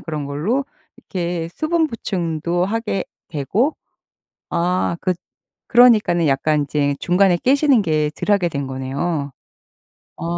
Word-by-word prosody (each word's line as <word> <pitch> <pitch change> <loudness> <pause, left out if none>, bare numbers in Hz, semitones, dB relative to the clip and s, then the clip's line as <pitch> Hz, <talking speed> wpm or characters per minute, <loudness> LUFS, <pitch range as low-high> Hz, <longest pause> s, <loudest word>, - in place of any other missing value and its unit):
그런 155 -3 -4
걸로 175 - -1 0.3
이렇게 175 -2 -4
수분 320 0 +1
보충도 175 - -2
하게 210 -1 -2 0.2
되고 190 - 0 0.7
아 175 0 0
그 185 - +1 0.5
그러니깐은 215 -8 +5
약간 145 +2 +2
인제 145 0 0
중간에 180 0 +3
깨시는 275 - +3
게 155 -3 +1
덜 - - -1
하게 180 -4 +1
된 140 -3 -3
거네요. 140 +3 -3 0.9
아. - - -7
175 Hz, 245 characters per minute, -20 LUFS, 150-210 Hz, 0.9 s, 그러니깐은